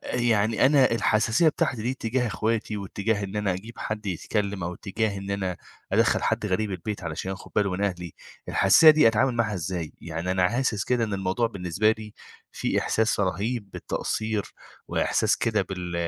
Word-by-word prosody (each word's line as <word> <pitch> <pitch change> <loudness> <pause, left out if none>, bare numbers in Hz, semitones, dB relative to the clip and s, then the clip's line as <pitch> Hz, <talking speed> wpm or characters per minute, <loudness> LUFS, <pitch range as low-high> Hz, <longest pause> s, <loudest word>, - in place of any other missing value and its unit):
يعني 115 -1 +3
أنا 135 -3 +5
الحساسية 110 +6 +3
بتاعتي 125 -6 -1
دي 120 - 0
اتجاه 125 0 -1
إخواتي 110 0 -1
واتجاه 100 +1 -2
إن 100 +2 -6
أنا 105 -2 +1
أجيب 110 +5 -9
حد 110 -1 -4
يتكلم 100 +1 -2
أو 90 +1 -3
اتجاه 100 +1 -2
إن 100 0 -6
أنا 95 -3 -2 0.4
أدخّل - - +3
حد - - 0
غريب 100 +2 -1
البيت 95 +1 -5
علشان 85 +4 -4
ياخد 95 - -8
باله 100 -2 +2
من 100 +3 -1
أهلي، 90 -3 -4 0.3
الحساسية 155 - +7
دي 155 -6 +6
أتعامل 120 +3 +2
معاها 110 -3 0
إزاي؟ 85 -2 -4
يعني 85 +2 -4
أنا 90 -1 +3
حاسس 120 -4 0
كده 120 -2 +1
إن 105 - -3
الموضوع 95 +4 0
بالنسبة 100 0 0
لي 110 -1 -9 0.4
فيه - - -1
إحساس 110 -2 +1
رهيب 100 +3 -2
بالتقصير، 110 -2 -2 0.4
وإحساس - - +1
كده 110 -3 +1
بال 90 -2 -6
105 Hz, 170 wpm, -26 LUFS, 95-115 Hz, 0.4 s, الحساسية